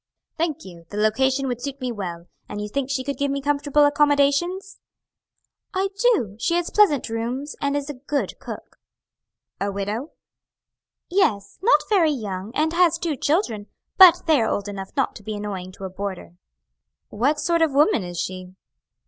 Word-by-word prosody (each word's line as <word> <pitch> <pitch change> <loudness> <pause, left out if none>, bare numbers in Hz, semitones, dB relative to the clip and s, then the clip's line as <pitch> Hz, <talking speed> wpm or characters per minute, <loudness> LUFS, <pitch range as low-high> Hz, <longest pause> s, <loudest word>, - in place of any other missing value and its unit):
"Thank 320 - -2
you, 170 -3 -12
the 205 - -7
location 265 +6 +2
would 245 -1 -3
suit 275 +1 -5
me 255 -2 -3
well; 175 -6 -6 0.2
and 205 - -5
you 210 - -3
think 270 +5 -3
she 265 -1 -1
could 280 +1 -4
give 280 0 +1
me 280 0 -1
comfortable 290 +1 +2
accommodations?" 290 +6 +2 1.0
"I 385 +1 +1 0.2
do; 210 - -2
she 335 +8 +1
has 350 0 -1
pleasant 390 -10 +4
rooms 245 +6 -4
and 280 0 0
is 285 -1 -4
a 295 - -4
good 280 +2 -3
cook." - - -9 0.8
"A 200 +1 -1
widow?" 205 +8 -4 0.9
"Yes, 230 - 0
not 465 +6 +3
very 370 -7 +4
young, 210 -7 -4
and 315 +2 +1
has 345 -2 +4
two 330 -4 -2
children. 250 - 0 0.3
But 370 -3 +9
they 310 -6 +4
are 225 - +1
old 205 0 -2
enough 195 -1 -6
not 270 - 0
to 210 - -15
be 215 +1 -4
annoying 195 -3 -5
to 195 - -12
a - - -4
boarder." 190 - -6 0.8
"What 280 +8 0
sort 335 +2 +1
of 320 -2 +3
woman 300 - +4
is 175 -1 -6
she?" 185 0 -5
270 Hz, 175 wpm, -23 LUFS, 205-300 Hz, 1.0 s, But